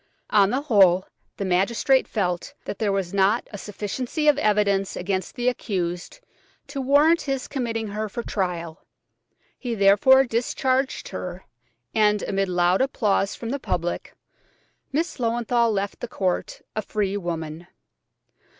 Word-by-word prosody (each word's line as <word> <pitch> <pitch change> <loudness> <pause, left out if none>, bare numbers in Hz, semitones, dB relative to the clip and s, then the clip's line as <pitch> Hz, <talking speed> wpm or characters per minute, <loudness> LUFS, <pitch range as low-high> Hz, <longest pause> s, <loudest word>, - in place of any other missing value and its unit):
On 200 -2 +5
the 260 +5 0
whole, 195 -9 +4 0.3
the 200 - -2
magistrate 225 +8 +2
felt 180 -5 -2
that - - -5
there 210 -2 +1
was 195 -2 -2
not 200 +4 +2
a 205 - -6
sufficiency 240 - -3
of 290 -1 +5
evidence 200 -4 +2
against 190 +1 -3
the 245 -1 -2
accused 185 - -2 0.5
to 275 -1 -4
warrant 290 +5 +4
his 270 -2 -3
committing 230 -5 -3
her 215 +1 -3
for 235 +4 -5
trial; 170 -6 -3 0.8
he 245 -3 -3
therefore 205 +7 +6
discharged 260 +2 -1
her, 180 -1 -6 0.5
and, 210 -1 +3
amid 195 -1 -1
loud 180 +2 +2
applause 210 -7 +1
from 230 - -6
the 280 - -2
public, 175 -8 -3 0.8
Miss 320 +5 -1
Löwenthal 235 -1 +1
left 200 -1 -2
the 245 - -5
court 185 -5 -2
a 215 - 0
free 200 -1 -2
woman. 165 -3 -4
210 Hz, 140 wpm, -24 LUFS, 190-245 Hz, 0.8 s, therefore